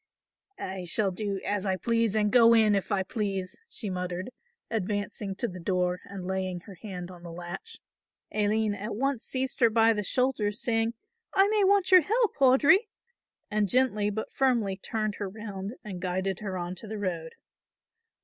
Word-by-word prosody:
"I 190 - -5
shall 195 +3 +2
do 200 +1 -3
as 205 -2 0
I 190 -2 0
please 230 +2 +1
and 210 -1 +2
go 230 -2 +7
in 215 -2 +5
if 200 +1 -1
I 195 -2 +2
please," 195 - -3
she 215 - -5
muttered, 180 +3 -4 0.4
advancing 205 -1 -3
to 240 - -1
the 185 -3 -8
door 180 0 0
and 195 -2 -7
laying 185 -1 -2
her 200 - -12
hand 185 -4 -6
on 175 -1 -12
the 170 -1 -9
latch. 175 - -7 0.5
Aline 215 0 +1
at 205 +2 -5
once 270 +1 -1
seized 260 0 -2
her 235 -3 +6
by 225 0 +4
the 210 - -1
shoulders, 225 -2 0
saying, 225 0 +1 0.4
"I 390 0 +6
may 425 -1 +3
want 390 -1 +3
your 370 -1 +9
help, 445 +7 +1
Audry," 285 - +5 0.6
and 210 -1 +1
gently 215 -3 +2
but 220 +1 -4
firmly 235 -7 +2
turned 215 +1 -3
her 200 -2 -3
round 205 0 -6
and 190 -4 -7
guided 185 +1 -1
her 195 -3 -4
on 175 0 -3
to 220 - -7
the 215 +1 -5
road. 170 -5 -3
210 Hz, 180 wpm, -28 LUFS, 190-230 Hz, 0.6 s, your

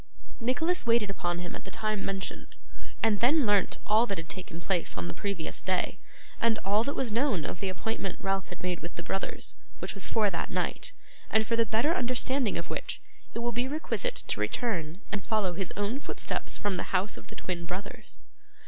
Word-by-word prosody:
Nicholas 320 +10 +2
waited 230 -3 +4
upon 175 -2 -1
him 175 0 -4
at - - -7
the - - -7
time 215 -2 -1
mentioned, 195 -1 -4 0.5
and 220 -3 +4
then 280 +4 +5
learnt 205 -3 +4
all 220 +3 +5
that 195 - -1
had 165 0 -4
taken 175 -2 -6
place 175 - 0
on 90 -1 -1
the - - -3
previous 200 -6 -2
day, 185 0 +1 0.4
and 230 -1 +4
all 205 +3 +4
that 280 +3 -1
was 250 -4 0
known 225 - +2
of - - -3
the 195 - 0
appointment 195 0 -2
Ralph 195 -1 0
had - - -9
made 180 -1 0
with 170 - -7
the 170 - -5
brothers; 195 - -1 0.2
which - - -2
was 195 -2 -4
for 210 -3 +3
that - - -2
night; - - -1 0.4
and 220 0 +4
for 230 - +2
the 230 -1 +3
better 230 +10 +3
understanding 255 - +2
of - - -4
which - - -3 0.4
it - - 0
will 240 - +1
be 245 +2 +1
requisite 315 - -1
to - - -1
return 185 - 0
and 205 - -1
follow 210 -5 +1
his 185 +1 -2
own 205 +6 0
footsteps - - -2
from 205 -3 0
the 185 - +2
house 195 +3 0
of - - -10
the - - -9
twin 175 -2 -3
brothers. 190 +3 -5
205 Hz, 205 wpm, -30 LUFS, 185-235 Hz, 0.5 s, then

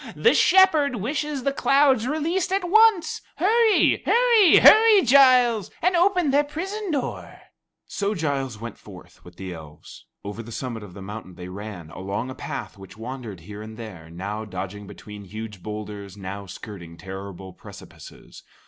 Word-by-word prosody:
The 465 - +4
Shepherd 320 -8 +4
wishes 285 +5 -3
the 275 - 0
clouds 275 -4 +3
released 330 +6 -1
at 385 -2 0
once. 435 -1 +4
Hurry, 440 +3 +3
hurry, 470 -5 +5
hurry, 435 -2 +7
Giles, 250 -5 +5
and 365 +2 +1
open 360 -4 +2
their 285 +2 +3
prison 380 +8 -5
door." 285 -6 -4 0.5
So 205 +1 -3
Giles 135 - -3
went 115 +1 -8
forth - - -15
with 90 0 -15
the 95 0 -7
elves. 75 -3 -13 0.2
Over 105 +2 -6
the 115 +1 -11
summit 120 -1 -5
of 95 -4 -12
the 100 - -9
mountain 100 -2 -9
they 90 0 -9
ran, 95 -4 -9
along 100 +9 -5
a - - -6
path - - -7
which 95 +2 -13
wandered 115 -5 -8
here 105 +4 -10
and 110 0 -10
there 95 -9 -10
now 100 +6 -5
dodging 100 0 -7
between 105 0 -11
huge 105 0 -8
boulders, 105 -1 -8
now 100 +1 -7
skirting 85 -3 -10
terrible 95 +1 -9
precipices. - - -14
115 Hz, 155 wpm, -23 LUFS, -, 0.5 s, hurry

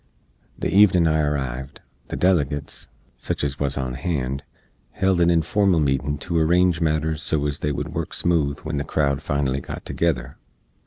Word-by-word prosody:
The - - -2
evenin 95 -4 +6
I 80 -1 +2
arrived, 65 -2 -3 0.3
the - - -5
delegates, 75 -6 0 0.3
sich - - -3
ez 70 -1 -2
wuz 70 -1 0
on 65 -2 -2
hand, 70 -2 -2 0.5
held 95 -2 +1
a 85 - +4
informal 85 +2 +2
meetin 70 0 0
to 85 -2 0
arrange 85 +1 +3
matters 75 -1 0
so 75 -2 0
ez 75 -1 -2
they 75 - -1
wood 70 - -4
work - - -3
smooth 75 -5 +1
when 80 -1 -4
the 70 - -1
crowd 70 -2 0
finally 70 -1 -1
got - - -8
together. 70 -8 -1
75 Hz, 165 wpm, -23 LUFS, 70-85 Hz, 0.5 s, evenin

